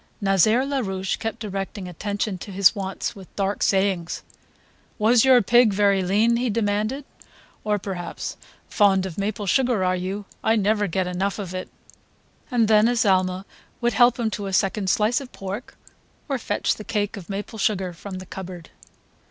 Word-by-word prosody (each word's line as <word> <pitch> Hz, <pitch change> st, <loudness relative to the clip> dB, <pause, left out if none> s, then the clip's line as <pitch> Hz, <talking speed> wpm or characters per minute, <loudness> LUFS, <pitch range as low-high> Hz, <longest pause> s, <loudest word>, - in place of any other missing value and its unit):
Nazaire 210 Hz, +5 st, +3 dB
Larouche 195 Hz, -9 st, -2 dB
kept 225 Hz, -1 st, -3 dB
directing 195 Hz, -2 st, -5 dB
attention 200 Hz, +2 st, -3 dB
to 205 Hz, -, -8 dB
his 195 Hz, 0 st, +5 dB
wants 195 Hz, +2 st, -4 dB
with 190 Hz, -3 st, -11 dB
dark 200 Hz, 0 st, -1 dB
sayings: 190 Hz, -3 st, +1 dB, 0.7 s
"Was 225 Hz, +1 st, +4 dB
your 260 Hz, -3 st, +6 dB
pig 240 Hz, 0 st, +5 dB
very 200 Hz, -1 st, +3 dB
lean?" 210 Hz, +6 st, +2 dB
he 245 Hz, +1 st, 0 dB
demanded; 215 Hz, +5 st, -1 dB, 0.6 s
or 210 Hz, -1 st, +1 dB
perhaps: 190 Hz, -3 st, -5 dB, 0.3 s
"Fond 195 Hz, -2 st, +3 dB
of 185 Hz, -1 st, -6 dB
maple 205 Hz, +1 st, -2 dB
sugar, 240 Hz, 0 st, +2 dB
are 185 Hz, 0 st, +2 dB
you? 190 Hz, +3 st, -4 dB, 0.2 s
I 220 Hz, -, +3 dB
never 210 Hz, 0 st, +2 dB
get 185 Hz, +1 st, -1 dB
enough 185 Hz, +2 st, -2 dB
of 190 Hz, -4 st, -5 dB
it 185 Hz, 0 st, -5 dB, 0.4 s
..." -, -, -36 dB
And 240 Hz, -4 st, +2 dB
then 215 Hz, 0 st, +5 dB
Azalma 190 Hz, -5 st, +2 dB, 0.3 s
would 240 Hz, -1 st, +1 dB
help 240 Hz, +2 st, +5 dB
him 225 Hz, -2 st, 0 dB
to 200 Hz, 0 st, -4 dB
a 195 Hz, -, -5 dB
second 195 Hz, +1 st, +1 dB
slice 220 Hz, +7 st, +2 dB
of 260 Hz, -, -10 dB
pork 195 Hz, +5 st, -7 dB, 0.5 s
or 275 Hz, -4 st, -1 dB
fetch -, -, 0 dB
the 215 Hz, -, -7 dB
cake 205 Hz, 0 st, -2 dB
of 195 Hz, -3 st, -10 dB
maple 205 Hz, +3 st, -5 dB
sugar 190 Hz, -3 st, 0 dB
from 190 Hz, +3 st, -8 dB
the 185 Hz, 0 st, -7 dB
cupboard. 180 Hz, -3 st, -8 dB
200 Hz, 170 wpm, -23 LUFS, 190-220 Hz, 0.7 s, your